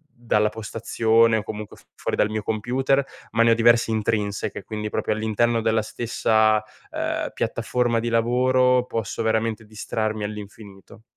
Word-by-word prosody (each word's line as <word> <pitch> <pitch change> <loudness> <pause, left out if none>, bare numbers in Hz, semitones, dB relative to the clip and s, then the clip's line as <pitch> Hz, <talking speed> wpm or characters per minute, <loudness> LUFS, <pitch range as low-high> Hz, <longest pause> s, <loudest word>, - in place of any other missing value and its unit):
dalla 105 -3 +1
postazione 115 +1 +1
o 105 - -3
comunque 105 0 -7
f - - -20
fuori - - -3
dal 105 - +2
mio 110 -1 -3
computer, 130 +6 0 0.3
ma 115 0 +3
ne 115 - +5
ho - - +7
diverse 115 0 +4
intrinseche, 105 -2 -2
quindi 105 -1 -5
proprio - - -2
all'interno 110 +2 +1
della 110 0 +2
stessa, 110 -1 +1 0.3
ehm, - - -2
piattaforma 120 -2 0
di 120 - -3
lavoro, 125 +2 +3
posso 115 -4 -3
veramente 110 0 0
distrarmi 110 0 -3
all'infinito. 105 0 -9
110 Hz, 145 wpm, -23 LUFS, 105-115 Hz, 0.3 s, ho